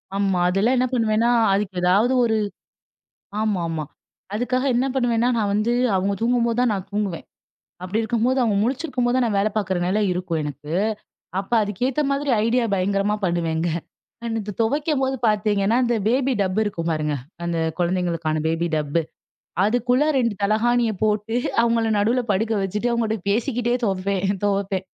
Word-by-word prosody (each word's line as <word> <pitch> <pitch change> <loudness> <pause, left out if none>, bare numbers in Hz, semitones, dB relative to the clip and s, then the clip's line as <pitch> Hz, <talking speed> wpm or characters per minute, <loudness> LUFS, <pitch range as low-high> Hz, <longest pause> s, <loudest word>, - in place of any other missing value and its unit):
ஆமா, 195 -2 +1
அதெல்லாம் 205 +8 +2
என்ன 255 +1 +2
பண்ணுவேன்னா 225 -1 +2 0.2
அதுக்கு 195 -2 -1
ஏதாவது 200 +8 +3
ஒரு 220 -1 +1 1.0
ஆமாமா. 170 -7 -1 0.5
அதுக்காக 250 +4 0
என்ன 250 +2 +2
பண்ணுவேன்னா 245 -3 +1
நான் 205 -3 0
வந்து 215 +3 +1 0.2
அவங்க 195 +2 +1
தூங்கும்போது 235 -1 +1
தான் 250 -3 +2
நான் 195 -1 -4
தூங்குவேன். 200 -5 -2 0.6
அப்படி 190 +5 -1
இருக்கும்போது 235 +3 0
அவங்க 220 -4 +1
முழிச்சிருக்கும் 255 +1 -1
போது 245 - +1
தான் 255 -1 +2
நான் 210 -3 0
வேலை 210 +2 +2
பார்க்கிற 190 -3 0
நிலை 205 +4 +1
இருக்கும் 180 -2 -2
எனக்கு. 150 +1 -7 0.7
அப்ப 195 - -7
அதுக்கு 205 +1 -6
ஏத்த 270 +3 0
மாதிரி 280 +1 -1 0.2
ஐடியா 235 +1 +2
பயங்கரமா 200 +2 +1
பண்ணுவேங்க. 170 -1 0 0.6
இந்த 220 -2 -3
துவைக்கும் 290 +5 0
போது 265 0 0
பார்த்தீங்கன்னா 210 0 +2
இந்த 240 -1 +1
பேபி 265 +3 +2
டப்பு 190 +2 +1
இருக்கும் 170 -5 -2
பாருங்க. 150 -2 -1 0.3
அந்த 170 -1 -1 0.2
குழந்தைகளுக்கான 170 -3 0
பேபி 165 +1 0
டப்பு, 150 +2 0 0.6
அதுக்குள்ள 245 +4 +2
இரண்டு 240 -6 +1
தலைகாணிய 230 +3 +2
போட்டு 210 +1 0 0.3
அவங்களை 230 -1 +2
நடுவுல 230 +5 +2
படுக்க 220 +4 0
வெச்சுட்டு 210 +5 -1
அவங்ககிட்ட 220 -4 -1
பேசிக்கிட்டே 240 +2 0
துவைப்பேன், 195 0 0
துவைப்பேன். 195 -2 0
210 Hz, 150 wpm, -22 LUFS, 190-240 Hz, 1.0 s, ஏதாவது